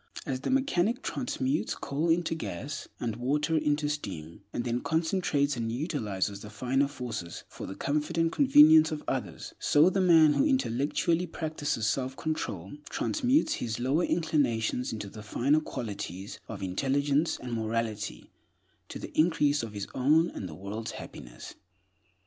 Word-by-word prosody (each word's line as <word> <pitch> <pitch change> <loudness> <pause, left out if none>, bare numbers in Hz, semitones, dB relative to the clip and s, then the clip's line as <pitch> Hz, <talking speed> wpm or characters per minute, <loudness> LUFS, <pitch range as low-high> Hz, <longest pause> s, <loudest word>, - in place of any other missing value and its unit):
As 130 -1 -2
the - - -2
mechanic 260 -3 +1
transmutes 145 - -1
coal 150 +5 -2
into 165 0 +2
gas, 140 - -5
and 115 -3 -3
water 150 +6 0
into 150 -1 +1
steam, 90 - -5
and 120 - -2
then 120 0 -1
concentrates 160 -4 +1
and 115 -2 -2
utilizes 110 - -2
the 105 - -9
finer 130 +6 +1
forces 115 - -6
for - - -8
the 95 - -6
comfort 150 +3 -1
and 165 0 +3
convenience 160 - +7
of 155 -1 -4
others, - - -4
so 155 +5 +5
the 195 - +1
man 165 -4 +6
who - - +3
intellectually 170 - +1
practices 155 -8 -2
selfcontrol 130 - -3
transmutes 300 +2 +1
his 115 0 -2
lower 135 +8 +1
inclinations 135 -8 0
into 105 -2 -5
the 105 +2 -10
finer 135 +7 +2
qualities 100 - -6
of - - -6
intelligence 140 - +1
and 125 - -7
mortality 110 -2 -3 0.6
to - - -6
the - - -9
increase 150 -3 +3
of 115 -2 -6
his 100 -1 -4
own 155 +6 +3
and 95 - -6
the 75 - -8
world's 105 +5 -5
happiness. - - -9
140 Hz, 150 wpm, -29 LUFS, 115-160 Hz, 0.6 s, convenience